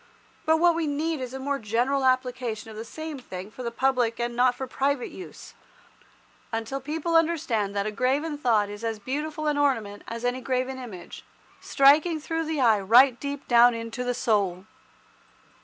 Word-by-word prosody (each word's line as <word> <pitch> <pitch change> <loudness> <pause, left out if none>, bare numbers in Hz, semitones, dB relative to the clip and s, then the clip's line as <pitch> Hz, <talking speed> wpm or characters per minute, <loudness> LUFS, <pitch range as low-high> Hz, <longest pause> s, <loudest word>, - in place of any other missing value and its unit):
But 320 0 +5
what 345 +1 +4
we 330 -1 -1
need 305 +1 -2
is 250 -1 -5
a 265 - -6
more 275 +1 -2
general 245 +6 0
application 250 -4 -1
of - - -11
the 220 - -6
same 315 +4 -7
thing 190 -4 -8
for 240 +1 -5
public 245 -1 0
and 240 0 -2
not 250 0 +3
for 265 - -4
private 270 0 -1
use, 370 - -11 1.0
until 225 +4 -3
people 320 +4 -2
understand 290 -12 +1
that 200 0 0
a 215 - -2
graven 270 +8 0
thought 230 -7 +2
is 205 +2 -9
as 225 -1 -2
beautiful 300 +7 -4
an 295 -1 +1
ornament 225 -8 0
as 230 +1 -5
any 250 +1 -1
graven 255 0 -2
image, 215 -9 -9 0.4
striking 300 +4 +4
through 325 +2 -3
the 310 -1 -2
eye 225 -5 +4
right 240 +5 +5
deep 280 0 -5
down 240 0 +6
into 230 +2 -5
the 245 0 -1
soul. 200 -6 0
255 Hz, 175 wpm, -26 LUFS, 230-290 Hz, 1.0 s, down